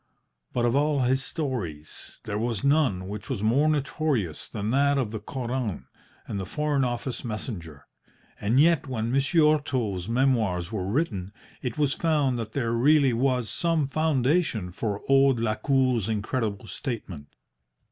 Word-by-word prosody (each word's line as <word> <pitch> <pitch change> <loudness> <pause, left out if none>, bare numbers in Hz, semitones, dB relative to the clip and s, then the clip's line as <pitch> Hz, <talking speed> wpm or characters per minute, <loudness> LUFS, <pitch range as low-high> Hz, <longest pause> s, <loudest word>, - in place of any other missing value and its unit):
But 120 -1 0
of 120 +1 +2
all 145 -1 +2
his 130 +2 +2
stories 105 - -5
there 105 0 -3
was 115 -2 -2
none 140 -11 +2
which 105 0 -7
was 100 - -2
more 135 +8 +3
notorious 140 - -1
than 105 0 -3
that 140 +2 +3
of 125 -6 -1
the 110 - -4
Koran 120 -2 -4 0.4
and 100 - -4
the 95 - -3
Foreign 150 -2 0
Office 120 +1 -3
messenger. 100 - -6 0.5
And 110 +6 +2
yet 165 -1 +4
when 115 -3 -2
Monsieur 150 +4 +4
Otto's 115 -10 -3
memoirs 115 -9 +1
were 95 -4 -3
written 100 - -1 0.3
it 125 -3 -4
was 145 -2 +2
found 145 -7 +1
that 110 -1 -5
there 115 -4 -1
really 135 +2 +4
was 125 -1 +1
some 165 -3 +1
foundation 140 - +1
for 100 +2 -3
old 135 -2 +4
Lacour's 115 0 +1
incredible 110 -1 -2
statement. 100 - -6
125 Hz, 145 wpm, -26 LUFS, 105-140 Hz, 0.5 s, yet